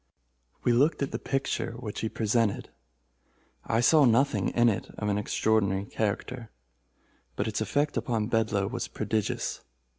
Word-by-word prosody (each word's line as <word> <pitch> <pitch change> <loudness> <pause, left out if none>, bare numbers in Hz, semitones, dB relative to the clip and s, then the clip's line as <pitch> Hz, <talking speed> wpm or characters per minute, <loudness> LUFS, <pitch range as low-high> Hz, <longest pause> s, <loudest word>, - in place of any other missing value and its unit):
We 120 - +3
looked 145 +5 +3
at 140 - -3
the - - -3
picture 135 -3 -2
which 115 -3 -6
he 110 - -2
presented. 110 -1 0 0.9
I 115 - +1
saw 150 +5 +6
nothing 115 -4 +3
in 120 0 +3
it 110 -5 0
of 105 - -2
an 100 0 +1
extraordinary 100 -2 +1
character, 110 +3 -3 0.9
but 105 - -1
its 110 0 -2
effect 145 +6 0
upon 115 -4 0
Bedloe 110 -3 +1
was 120 +4 -3
prodigious. 110 -1 -2
110 Hz, 145 wpm, -28 LUFS, 105-120 Hz, 0.9 s, saw